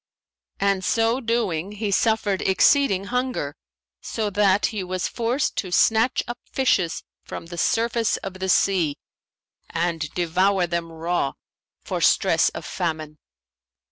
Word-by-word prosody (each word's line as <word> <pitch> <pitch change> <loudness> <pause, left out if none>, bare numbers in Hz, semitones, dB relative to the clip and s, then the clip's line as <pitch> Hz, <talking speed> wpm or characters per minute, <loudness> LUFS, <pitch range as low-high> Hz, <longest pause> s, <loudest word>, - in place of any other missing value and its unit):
And 195 -1 +1
so 225 +5 +2
doing 210 -6 -1
he 210 -1 -3
suffered 215 -2 +1
exceeding 195 +1 +3
hunger, 250 - -1 0.5
so 215 -2 -3
that 200 0 +3
he 205 -3 -3
was 185 0 -2
forced 240 +4 -1
to 185 - -2
snatch 225 +7 +3
up 240 0 -5
fishes 195 -10 +1 0.2
from - - -7
the 170 +1 -9
surface 230 +4 +1
of 190 -1 -8
the 190 0 -2
sea 175 -7 +2 0.7
and 165 -2 -2
devour 180 +2 +2
them 170 -1 -3
raw, 165 -3 -1 0.5
for - - -3
stress - - +4
of - - -8
famine. 155 -3 -4
190 Hz, 130 wpm, -23 LUFS, 170-225 Hz, 0.7 s, stress